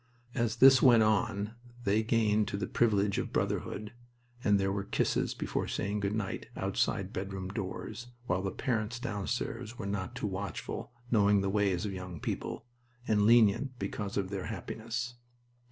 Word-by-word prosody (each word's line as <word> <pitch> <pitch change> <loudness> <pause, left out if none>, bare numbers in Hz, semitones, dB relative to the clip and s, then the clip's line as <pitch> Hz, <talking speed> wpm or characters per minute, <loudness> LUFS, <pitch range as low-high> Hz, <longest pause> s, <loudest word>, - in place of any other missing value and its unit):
As 115 -1 0
this 130 +1 +8
went 120 -4 +7
on 105 0 +1 0.3
they 105 0 +3
gained 110 -2 +2
to 100 - -2
the 100 - -1
privilege 105 -3 +2
of - - -3
brotherhood, 105 +2 -2 0.5
and 100 -1 +4
there 95 0 +1
were 100 0 -1
kisses - - 0
before - - -2
saying 105 +2 -1
"good 100 +1 -1
night" 105 -3 -3
outside - - 0
bedroom 95 0 -4
doors, 105 +3 -5 0.2
while 90 -5 0
the 95 - -1
parents 115 +1 -1
downstairs 115 +1 -3
were 100 - -5
not 100 -2 -3
too - - -3
watchful, 100 +3 -4 0.2
knowing 100 -3 +4
the 95 0 0
ways 100 -3 +1
of 100 - -3
young 90 -3 -6
people, - - -4 0.4
and 105 -1 +3
lenient 120 +3 +4
because 100 -4 -4
of 95 -1 -1
their 95 -2 -3
happiness. 120 +2 -4
105 Hz, 160 wpm, -31 LUFS, 100-115 Hz, 0.5 s, this